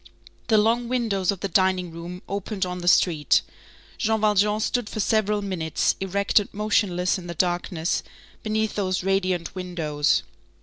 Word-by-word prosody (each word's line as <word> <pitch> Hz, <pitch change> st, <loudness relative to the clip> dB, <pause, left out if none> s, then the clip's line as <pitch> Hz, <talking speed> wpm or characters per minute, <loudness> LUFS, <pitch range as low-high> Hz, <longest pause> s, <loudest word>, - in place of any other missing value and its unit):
The 220 Hz, -, +4 dB
long 230 Hz, +3 st, +2 dB
windows 220 Hz, -7 st, 0 dB
of 195 Hz, -, -7 dB
the 200 Hz, -, -1 dB
dining 185 Hz, -1 st, +1 dB
room 170 Hz, +2 st, -8 dB
opened 200 Hz, 0 st, -3 dB
on 180 Hz, 0 st, -5 dB
the 175 Hz, -, -6 dB
street. 165 Hz, -4 st, +4 dB, 0.6 s
Jean 220 Hz, -1 st, +1 dB
Valjean 210 Hz, 0 st, +2 dB
stood 230 Hz, 0 st, -1 dB
for -, -, -5 dB
several 210 Hz, 0 st, +1 dB
minutes, 170 Hz, -5 st, 0 dB
erect 200 Hz, +2 st, +2 dB
and 205 Hz, -, -6 dB
motionless 200 Hz, -3 st, +1 dB
in 175 Hz, -, -10 dB
the 170 Hz, -, -6 dB
darkness, 175 Hz, -1 st, 0 dB, 0.4 s
beneath 220 Hz, -1 st, -1 dB
those 185 Hz, -2 st, -1 dB
radiant 185 Hz, -3 st, 0 dB
windows. 165 Hz, -6 st, 0 dB
195 Hz, 155 wpm, -24 LUFS, 180-210 Hz, 0.6 s, The